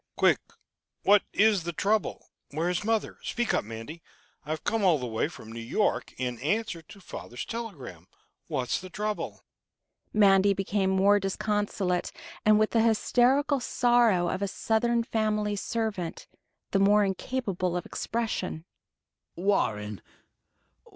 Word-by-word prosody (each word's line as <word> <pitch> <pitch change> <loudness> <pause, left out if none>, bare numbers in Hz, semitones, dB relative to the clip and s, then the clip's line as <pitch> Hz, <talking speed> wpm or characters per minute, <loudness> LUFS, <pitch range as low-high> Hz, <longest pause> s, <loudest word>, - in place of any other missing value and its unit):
"Quick! - - +4 0.6
What 205 0 +6
is 210 -2 +4
the 170 +1 -4
trouble? 210 +6 -1 0.2
Where 165 +5 -1
is 180 +2 -1
mother? 225 0 -1
Speak 240 0 -1
up, - - +1
Mandy.... 115 +10 -8 0.4
I've 155 +1 -4
come 225 -2 0
all 180 -5 +5
the 125 - -4
way 110 -2 -1
from 110 - -11
New 115 - -7
York 120 - 0
in 125 -2 -3
answer 190 - -1
to 200 +5 -15
father's 120 -9 -7
telegram. 155 - -7 0.4
What's 125 +4 -1
the 185 - -9
trouble?" 210 +3 -4 0.7
Mandy 200 -1 +5
became 195 0 0
more 195 +2 +4
disconsolate, 195 -2 -1 0.3
and, 215 0 +6
with 215 0 +2
the 225 - +3
hysterical 255 +5 +3
sorrow 240 -7 +3
of 185 - -2
a 200 - 0
Southern 230 +4 +1
family 215 -3 0
servant, 205 -5 -3 0.5
the 195 - +2
more 205 +1 +5
incapable 190 -3 -2
of 175 - -4
expression. 220 -8 -3 0.7
"Warren 105 - 0
200 Hz, 135 wpm, -28 LUFS, 170-220 Hz, 0.7 s, What